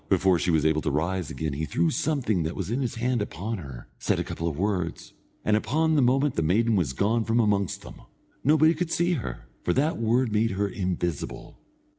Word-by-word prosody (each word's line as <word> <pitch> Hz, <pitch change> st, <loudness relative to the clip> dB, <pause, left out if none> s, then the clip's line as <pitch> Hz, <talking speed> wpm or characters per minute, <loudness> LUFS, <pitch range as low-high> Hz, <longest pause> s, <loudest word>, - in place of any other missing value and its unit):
Before 95 Hz, -2 st, +3 dB
she -, -, 0 dB
was 80 Hz, -3 st, +2 dB
able 80 Hz, 0 st, +2 dB
to -, -, -1 dB
rise 85 Hz, +3 st, -1 dB
again 75 Hz, +2 st, -3 dB
he 75 Hz, +3 st, -2 dB
threw 85 Hz, +1 st, +1 dB
something 125 Hz, -, 0 dB
that 80 Hz, +1 st, -3 dB
was -, -, -4 dB
in 125 Hz, +4 st, 0 dB
his 125 Hz, -2 st, -2 dB
hand 120 Hz, 0 st, 0 dB
upon 105 Hz, +2 st, -4 dB
her, 65 Hz, -7 st, -9 dB
said -, -, +1 dB
a -, -, 0 dB
couple 85 Hz, -, -4 dB
of 75 Hz, -4 st, -3 dB
words, 90 Hz, -3 st, -2 dB, 0.3 s
and 105 Hz, -, +3 dB
upon 155 Hz, +10 st, +1 dB
the 150 Hz, -, +4 dB
moment 135 Hz, +3 st, +3 dB
the -, -, 0 dB
maiden 110 Hz, +8 st, +2 dB
was 80 Hz, -9 st, 0 dB
gone 110 Hz, -, +1 dB
from 115 Hz, +2 st, +1 dB
amongst 100 Hz, -4 st, +1 dB
them. -, -, -11 dB, 0.4 s
Nobody 155 Hz, +3 st, +5 dB
could 170 Hz, +1 st, -2 dB
see 175 Hz, +2 st, +2 dB
her, 65 Hz, -, -5 dB, 0.2 s
for 90 Hz, -, +1 dB
that 150 Hz, +1 st, +1 dB
word 115 Hz, +1 st, +2 dB
made 110 Hz, +2 st, +2 dB
her 100 Hz, 0 st, +1 dB
invisible. 90 Hz, -5 st, -4 dB
105 Hz, 215 wpm, -26 LUFS, 85-125 Hz, 0.4 s, Nobody